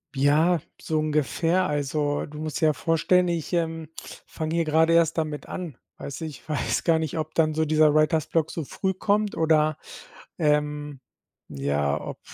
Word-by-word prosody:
Ja, 155 Hz, +5 st, +3 dB, 0.2 s
so 155 Hz, -1 st, -1 dB
ungefähr, 155 Hz, +4 st, +1 dB
also, 145 Hz, 0 st, -1 dB
du 150 Hz, +1 st, -10 dB
musst 155 Hz, -1 st, -4 dB
dir 160 Hz, -, +2 dB
ja 155 Hz, -, +3 dB
vorstellen, 175 Hz, +3 st, +2 dB
ich, 170 Hz, 0 st, -3 dB
ähm, 165 Hz, -2 st, -1 dB, 0.4 s
fange 160 Hz, +1 st, -4 dB
hier 165 Hz, -1 st, +1 dB
gerade 160 Hz, +2 st, +3 dB
erst 165 Hz, -1 st, +3 dB
damit 155 Hz, -2 st, -3 dB
an, 170 Hz, -9 st, -6 dB, 0.2 s
weißt 140 Hz, -, -6 dB
du, -, -, -3 dB
ich 150 Hz, -1 st, -10 dB
weiß 150 Hz, -, -1 dB
gar 165 Hz, -2 st, +3 dB
nicht, 160 Hz, 0 st, -3 dB
ob 155 Hz, 0 st, -4 dB
dann 155 Hz, -1 st, +2 dB
so 160 Hz, +1 st, +1 dB
dieser 155 Hz, -1 st, +4 dB
Writer's 155 Hz, 0 st, +2 dB
Block 160 Hz, -2 st, 0 dB
so 160 Hz, -4 st, -4 dB
früh 190 Hz, +6 st, -2 dB
kommt 205 Hz, +2 st, 0 dB
oder, 155 Hz, -1 st, +2 dB, 0.6 s
ähm, 150 Hz, -2 st, 0 dB, 0.5 s
ja, 70 Hz, +1 st, -1 dB
ob -, -, -7 dB
155 Hz, 175 wpm, -25 LUFS, 150-165 Hz, 0.6 s, dieser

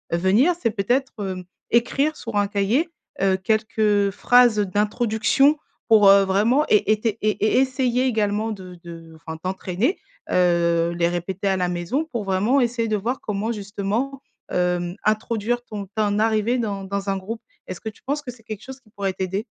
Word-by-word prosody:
venir 200 Hz, -, +3 dB
c'est 230 Hz, -, +2 dB
peut-être, 240 Hz, +6 st, 0 dB
hem, 185 Hz, -1 st, -5 dB, 0.3 s
écrire 275 Hz, +6 st, +2 dB
sur 230 Hz, -2 st, -7 dB
un 205 Hz, 0 st, +3 dB
cahier, 210 Hz, -, +1 dB, 0.3 s
heu, 190 Hz, -1 st, +3 dB
quelques 215 Hz, 0 st, +1 dB
phrases 245 Hz, +2 st, +4 dB
d'introduction 220 Hz, +7 st, +2 dB, 0.3 s
pour, 215 Hz, -3 st, +6 dB
heu, 195 Hz, 0 st, +7 dB
vraiment 215 Hz, +9 st, +3 dB
é 210 Hz, 0 st, +3 dB
été 215 Hz, 0 st, 0 dB
é 215 Hz, -, +3 dB
é 215 Hz, -, +2 dB
essayer 260 Hz, -1 st, +1 dB
également 220 Hz, -2 st, 0 dB
de 185 Hz, -3 st, -8 dB
de 165 Hz, -1 st, -11 dB
enfin, 160 Hz, 0 st, -8 dB
t'entraîner. 190 Hz, -, -2 dB, 0.3 s
Heu, 170 Hz, -1 st, +2 dB
les 170 Hz, 0 st, +1 dB
répéter 175 Hz, +3 st, -3 dB
à 190 Hz, -1 st, +2 dB
la 180 Hz, -1 st, 0 dB
maison 180 Hz, -, -2 dB
pour 240 Hz, -9 st, -4 dB
vraiment 200 Hz, +8 st, +2 dB
essayer 235 Hz, -1 st, 0 dB
de 215 Hz, -, 0 dB
voir 230 Hz, +6 st, -2 dB
comment 210 Hz, +2 st, -2 dB
justement, 215 Hz, +6 st, -3 dB, 0.3 s
hem, 180 Hz, 0 st, 0 dB
introduire 225 Hz, +2 st, 0 dB
ton 205 Hz, -4 st, -6 dB
ton 210 Hz, -1 st, +1 dB
arrivée 220 Hz, +2 st, +1 dB
dans 200 Hz, -4 st, -3 dB
dans 200 Hz, +1 st, -3 dB
un 195 Hz, -, 0 dB
groupe. 220 Hz, +5 st, -6 dB, 0.2 s
Est-ce 185 Hz, -, -7 dB
que 220 Hz, -, -4 dB
tu 215 Hz, -, -18 dB
penses 290 Hz, +2 st, -2 dB
que 275 Hz, -, -9 dB
c'est 235 Hz, -2 st, -19 dB
quelque 215 Hz, -1 st, -7 dB
chose 265 Hz, +1 st, -9 dB
qui 230 Hz, -6 st, -27 dB
pourrait 195 Hz, -2 st, -2 dB
t'aider? 190 Hz, +3 st, -3 dB
210 Hz, 180 wpm, -22 LUFS, 190-235 Hz, 0.3 s, heu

